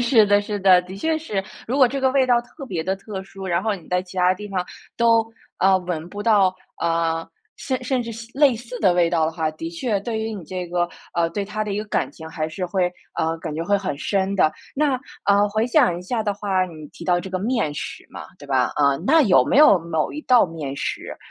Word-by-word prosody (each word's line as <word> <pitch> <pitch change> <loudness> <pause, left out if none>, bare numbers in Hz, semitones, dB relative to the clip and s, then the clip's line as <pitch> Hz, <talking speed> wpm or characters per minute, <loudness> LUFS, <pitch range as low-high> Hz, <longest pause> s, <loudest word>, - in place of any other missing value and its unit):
是 235 -3 +5
的 205 0 +4
是 205 0 -3
的， 185 -2 +6
的 185 +2 -9
确 320 +9 0
是。 215 -12 -3 0.2
如 250 - -1
果 260 -3 +6
这 275 +3 -3
个 265 0 +3
味 265 -1 +3
道 245 -1 +4
特 275 +3 -11
别 175 -9 -3
地 190 +2 0
特 195 -1 -7
殊， 190 0 -9
然 175 0 0
后 215 0 0
你 175 -5 -12
在 180 0 +1
其 185 0 -14
他 180 0 +4
地 210 +3 -8
方 185 -2 -2 0.3
都， 230 -1 +4 0.3
呃， 190 0 +5
闻 175 -3 -4
不 205 +2 -6
到， 205 -4 +4 0.3
呃， 165 -1 0 0.3
甚 260 -2 -3
甚 250 -1 0
至 230 - -6
西 230 +1 -9
类 285 -4 +5
似 240 +2 -8
的 190 -4 +4
味 175 -1 +3
道 165 -2 +2
的 160 - -1
话， 160 -1 -1
的 165 +1 -6
确 205 +5 -1
对 220 +2 -3
于 220 0 -3
你 190 -5 -8
这 180 +2 -5
个， 175 0 0 0.3
呃， 170 -1 +2
对 205 - -3
它 215 +1 -3
的 210 - -3
一 200 - -2
个 210 - -3
感 - - -1
情 160 -1 -10
还 155 -1 -3
是 180 +3 -4
会， 180 -1 0 0.2
呃， 160 +1 0
感 160 -2 -5
觉 165 +2 -3
会 205 +3 +2
很 185 -8 -3
深 195 +5 -1
的。 155 -5 +3 0.2
那， 275 -3 +1 0.2
呃， 200 +1 +4
回 220 +3 0
想 245 - +3
一 180 - -9
下 225 +4 -2
的 205 -2 -1
话， 195 -2 0
你 155 -3 -10
提 - - -12
到 180 -1 +2
这 185 +2 -7
个 185 - -1
面 220 - 0
食 145 - -7
嘛， - - -9
对 145 - -12
吧？ 130 -3 +1
呃， 140 -2 +3
那 320 +2 +6
有 180 - +5
没 - - +1
有 290 -10 +7
某 160 -2 -2
一 300 - -5
道 250 -4 +5
面 155 -6 -6
食， - - -4
195 Hz, 270 characters per minute, -22 LUFS, 170-225 Hz, 0.3 s, 有